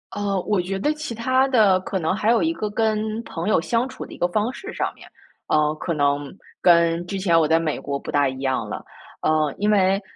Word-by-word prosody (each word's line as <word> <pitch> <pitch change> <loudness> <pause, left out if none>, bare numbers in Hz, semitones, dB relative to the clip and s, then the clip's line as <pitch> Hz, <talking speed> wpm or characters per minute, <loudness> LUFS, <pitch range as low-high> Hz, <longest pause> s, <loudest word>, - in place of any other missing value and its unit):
呃， 200 -1 -1
我 205 -4 +1
觉 195 +2 -4
得 295 +10 +1
其 305 -5 -6
它 260 +4 +2
的 210 -7 +4
可 190 0 -3
能 160 +3 0
还 215 +2 +2
有 235 - +3
一 325 - +1
个 215 -10 -3
跟 220 +1 -1
朋 170 +2 -4
友 215 - +4
相 230 +8 0
处 - - -8
的 - - -12
一 - - -10
个 175 - +1
方 215 +6 0
式 390 - -8
上 - - -2
面， - - -15 0.4
呃， 150 0 +2
可 170 +2 -3
能 145 0 0 0.3
跟 170 -1 +4
之 195 +2 -4
前 170 -3 +3
我 160 - +3
在 165 +1 +3
美 155 -3 -1
国 140 -1 -4
不 - - -10
大 145 -2 +2
一 130 0 -7
样 130 -1 -1
了。 - - -5 0.4
呃， 155 -2 +1
因 210 +1 0
为， 195 -1 +3
190 Hz, 255 characters per minute, -22 LUFS, 160-215 Hz, 0.4 s, 的